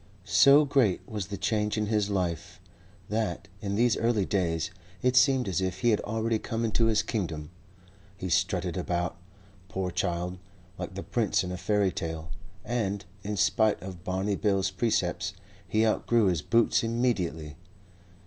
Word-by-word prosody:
So 140 +7 +6
great 130 -9 +2
was 105 -4 -4
the 100 -1 -5
change 105 +1 0
in 105 - +1
his 105 -1 +1
life 85 -4 -2 0.5
that, 105 -4 -2
in 100 -1 -2
these 120 +1 +3
early 115 -4 +1
days, 85 -5 0 0.3
it 125 0 +3
seemed 130 -2 +4
as 95 -1 0
if 95 0 -2
he 120 - +4
had 105 - +2
already 110 +1 -1
come 115 +1 -2
into 115 +1 +2
his 110 -1 +2
kingdom. 85 -9 -3 0.7
He 95 - -4
strutted 90 0 0
about, 90 -1 -2 0.5
poor 95 -3 -2
child, 90 +1 -2 0.4
like 95 - -5
the 100 - -5
prince 110 -6 +1
in 90 - -4
a - - -3
fairy 100 0 +1
tale, 80 -1 -5 0.3
and, 100 -5 -2 0.2
in 105 +1 -4
spite 110 +2 +3
of 90 -3 -8
Barney 95 +3 -1
Bill's 100 -1 +1
precepts, 95 -2 0 0.3
he 110 +2 +2
outgrew 115 +1 +2
his 90 -5 +1
boots 115 +10 +3
immediately. 95 - -1
100 Hz, 160 wpm, -28 LUFS, 90-110 Hz, 0.7 s, So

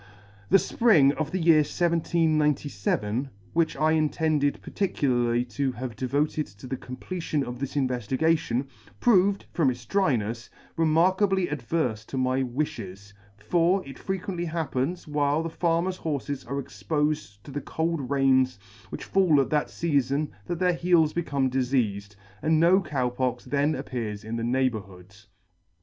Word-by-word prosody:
The 195 - +7
fpring 180 - +4
of 155 -2 -2
the 185 - -2
year 165 -2 +5
1797, 150 - 0 0.2
which 165 -1 +1
I 155 +3 +2
intended 155 -2 +1
particularly 120 -10 0
to 130 +2 -2
have 120 -1 -6
devoted 145 +5 -1
to 100 +4 -14
the 130 +1 -3
completion 150 +4 -4
of 125 0 -6
this 140 +1 -4
inveftigation, 130 +1 0 0.3
proved, 200 -3 +3
from 155 -6 +3
its 120 -1 -5
drynefs, 120 - 0 0.3
remarkably 185 +4 +3
adverfe 125 -5 -2
to 135 - -5
my 130 +1 +1
wifhes; 105 -7 -4 0.2
for 175 - +1
it 135 - -10
frequently 185 -2 -3
happens, 160 0 -2
while 150 +1 +1
the 165 - -3
farmers' 170 +2 0
horfes 145 -4 -4
are 140 +1 -2
expofed 150 -6 -2
to - - -10
the 145 - -4
cold 160 -4 -2
rains 130 -3 +3 0.3
which - - -6
fall 180 -7 +3
at 135 - 0
that 150 -1 +1
feafon 145 -2 0 0.2
that 175 - -2
their 180 +1 +2
heels 170 -3 +3
become 140 -6 0
difeafed, 120 -6 -1 0.3
and 160 0 +2
no 180 +4 +5
Cow 135 -7 -1
Pox 125 -1 -2
then 145 +2 +1
appeared 110 -4 -5
in 110 +2 -5
the 115 - -3
neighbourhood. 105 -7 -2
145 Hz, 140 wpm, -26 LUFS, 125-165 Hz, 0.3 s, The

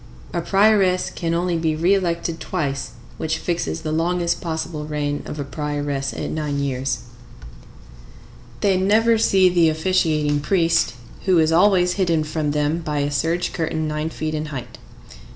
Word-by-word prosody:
A 170 - 0
prioress 195 0 +3
can 165 -1 -2
only 175 -1 0
be 160 -1 0
re 170 +5 +3
elected 170 -3 -1
twice, 140 -7 -3 0.3
which 160 0 -1
fixes 170 -1 -2
the 155 -1 -3
longest 170 +2 0
possible 160 -2 -4
reign 145 -1 -2
of 150 - -6
a - - -1
prioress 145 -1 -3
at - - -4
nine 150 -2 -2
years. 135 -3 -1 1.6
They 195 -2 +3
never 220 +4 +3
see 190 -3 +4
the 175 -2 +4
officiating 155 -3 +1
priest, 165 -3 +2 0.3
who 185 -2 +4
is 160 -1 +3
always 180 +1 +4
hidden 165 -4 +2
from 155 0 -2
them 150 +2 0
by 155 -3 -3
a 145 +1 -1
serge 165 +4 0
curtain 160 -1 -2
nine 150 +1 -2
feet 155 -1 -4
in 155 0 -3
height. 135 -5 -7
160 Hz, 155 wpm, -21 LUFS, 150-180 Hz, 1.6 s, see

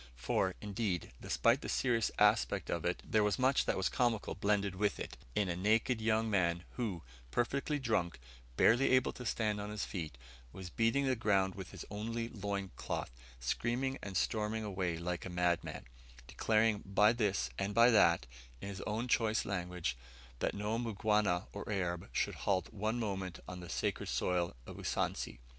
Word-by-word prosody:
For, 90 +9 0
indeed, 100 - -2
despite 120 +4 +2
the - - -5
serious 115 -4 +2
aspect - - +3
of - - -2
it, - - -1
there 110 -1 +3
was 105 -1 +2
much 130 +1 +3
that - - 0
was 95 - +2
comical 120 -5 0
blended 100 -1 +1
with 100 +2 0
it - - -5 0.2
in 105 - +2
a 85 - -1
naked 110 +5 +2
young 110 0 +2
man 90 -4 +1
who 105 -9 -3 0.3
perfectly 135 - 0
drunk, 110 - 0 0.4
barely 120 +5 +5
able 130 0 +4
to 125 - -6
stand 105 -3 0
on 105 - -5
his 105 -1 -3
feet 80 -8 -5 0.3
was 90 +1 -8
beating 120 +5 +2
the 130 -1 +2
ground 100 -5 +2
with 95 -2 -7
his - - -8
only 115 +3 -3
loin 100 -3 -3
cloth, - - -3 0.3
screaming 120 - -1
and 100 -2 -3
storming 110 -1 0
away 95 -5 -2
like 85 0 -3
a - - -5
madman; 90 -5 0 0.4
declaring 110 - +2
by 105 +3 +4
this, 105 -5 0
and 100 +1 -1
by 115 +1 +7
that, 85 - +5 0.3
in 100 - -6
his 100 -2 -6
own 110 +4 -1
choice 110 -2 +2
language, 90 -7 -2 0.4
that - - 0
no 105 +3 -1
Mgwana 105 -5 +1
or 100 +1 -5
Arab 90 -4 -2
should - - 0 0.2
halt 95 +1 +1
one 110 +3 -1
moment 95 -5 -3
on 90 0 -6
the 90 -1 -9
sacred - - -1
soil 90 -3 0
of - - -9
Usansi. - - -2
105 Hz, 175 wpm, -34 LUFS, 90-115 Hz, 0.4 s, by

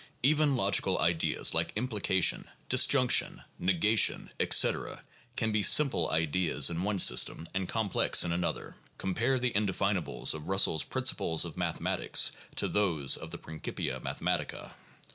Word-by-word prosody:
Even 150 0 +2
logical 100 -4 +1
ideas 85 -1 0
like - - -1
"implication," 105 -5 0 0.2
"disjunction," 130 0 +3 0.2
"negation," 95 +5 +1
etc., - - +2 0.3
can 110 - -2
be 105 0 0
simple 125 - +4
ideas 80 -1 +1
in 85 +1 -4
one 100 +1 -2
system, 85 -2 +2
and 95 -1 -4
complex 110 -4 +2
in 85 - -3
another. 85 0 -4 0.2
(Compare 115 +8 -1
the 125 -1 -1
indefinables 100 -3 -2
of 75 -1 -9
Bussell's 95 -5 +2
"Principles 80 -1 0
of - - -8
Mathematics" - - 0 0.3
with - - -3
those 85 -10 +1
of - - -9
the - - -4
"Principia 80 0 -6
Mathematica.") - - -4
95 Hz, 130 wpm, -29 LUFS, 85-110 Hz, 0.3 s, simple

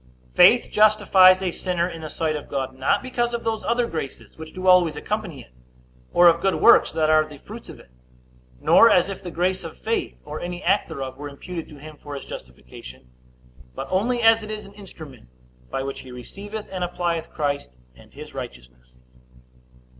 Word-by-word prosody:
Faith - - +6
justifies 195 -3 +5
a 180 - 0
sinner 175 -1 -2
in 165 -3 -8
the 155 - -6
sight 155 -1 -2
of 150 - -7
God, 135 -1 -3
not 130 +1 0
because 240 -2 -1
of 235 - -5
those 225 -1 -2
other 240 +1 +1
graces 160 - -7
which 160 0 -10
do 185 0 -7
always 180 -4 +5
accompany 190 -4 -4
it, 60 - -19 0.6
or 175 - +6
of 170 0 +4
good 195 0 +1
works 235 - +5
that 160 -1 0
are 155 0 +5
the 150 -1 -12
fruits - - -11
of - - -11
it, - - -19 0.7
nor 230 - +6
as 180 -1 +3
if 195 - -6
the 180 - -7
grace 180 +2 -1
of 165 - -9
faith, 225 +1 -3
or 150 +1 -6
any 175 +1 -6
act 195 +4 +2
thereof, 135 -4 -6
were 145 +1 -7
imputed 165 +4 -8
to 150 - -12
him 150 +1 -12
for 145 0 -9
his 140 - -8
justification; 60 0 -12 0.6
but - - -5
only 235 +6 0
as 225 0 +6
it 215 - -9
is 215 -1 -6
an 200 - -14
instrument 155 - -13 0.4
by 135 - -3
which 135 0 -5
he 130 - -11
receiveth 205 - -8
and 185 -2 -3
applieth 175 -2 -2
Christ 140 - -3 0.2
and 60 - -19
his - - -11
righteousness. 60 0 -10
170 Hz, 195 wpm, -23 LUFS, 140-195 Hz, 0.7 s, Faith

